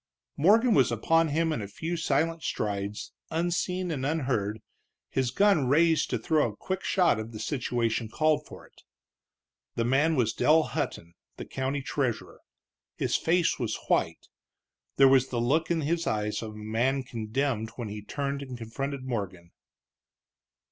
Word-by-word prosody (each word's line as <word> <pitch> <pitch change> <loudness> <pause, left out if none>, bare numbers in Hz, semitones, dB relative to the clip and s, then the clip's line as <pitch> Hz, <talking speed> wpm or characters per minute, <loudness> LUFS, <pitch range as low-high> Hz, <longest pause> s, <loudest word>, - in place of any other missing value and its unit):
Morgan 220 - +4
was 130 - +4
upon 165 +9 +2
him 160 +2 +1
in 130 - -3
a 100 - -5
few 165 - -4
silent 165 +1 0
strides, 100 -3 -3 0.2
unseen 175 +2 -1
and 135 -4 -3
unheard, 130 -8 -1 0.5
his 130 -2 0
gun 195 -5 +3
raised 160 +4 +3
to - - 0
throw 150 -7 +1
a - - -16
quick 190 0 -4
shot 175 - +2
if 110 +1 -5
the 110 -2 -8
situation 120 -4 -1
called 155 +4 +1
for - - -12
it. - - -22 0.9
The 115 - 0
man 145 +6 +3
was 115 -5 +1
Dell 160 +1 +4
Hutton, 115 - -4 0.2
the - - -6
county 135 +1 -3
treasurer. 130 -2 -3 0.5
His - - -1
face 170 -1 +2
was 120 -4 -2
white. - - +1 0.7
There 135 - +7
was 135 -1 +5
the 120 - -2
look 145 +8 +1
in 170 -2 +1
his 165 +3 -1
eyes 105 -1 -1
of 110 -2 -6
a - - -10
man 120 +6 0
condemned 115 0 -2
when 120 -4 -5
he 105 +1 -6
turned 140 +5 -3
and 130 -3 -7
confronted 135 +4 -5
Morgan. 95 -9 -5
135 Hz, 160 wpm, -28 LUFS, 115-160 Hz, 0.9 s, There